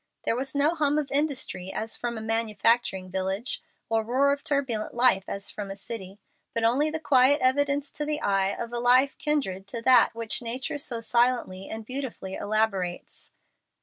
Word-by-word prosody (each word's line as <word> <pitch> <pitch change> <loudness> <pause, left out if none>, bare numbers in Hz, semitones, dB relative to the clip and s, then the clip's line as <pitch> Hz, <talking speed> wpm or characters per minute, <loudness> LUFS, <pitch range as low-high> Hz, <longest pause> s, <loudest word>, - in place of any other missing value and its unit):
There - - +1
was 270 +3 -3
no 290 +3 +3
hum 300 -3 +1
of 295 -3 -2
industry 275 -10 0
as 220 +2 -3
from 235 -1 -3
a - - -5
manufacturing 225 -3 +1
village, 190 +6 -2 0.3
or 225 -2 +1
roar 260 +5 +2
of 280 0 -2
turbulent 265 -8 -1
life 235 -6 +4
as 200 0 -3
from 205 -2 -6
a 195 - -5
city, 200 -1 -8 0.4
but 230 - 0
only 260 +7 +3
the 320 +1 -3
quiet 280 -1 +4
evidence 280 +2 +1
to 300 - -3
the 300 0 -1
eye 195 -6 +1
of 235 +3 -5
a 240 - -1
life 250 +3 +4
kindred 200 -11 -1
to 230 +3 -5
that 250 -3 +5
which 230 0 -1
nature 255 +4 -3
so 240 -4 -3
silently 235 -5 0
and 220 0 -6
beautifully 255 -7 -5
elaborates. 205 -5 -2
235 Hz, 180 wpm, -27 LUFS, 210-275 Hz, 0.4 s, that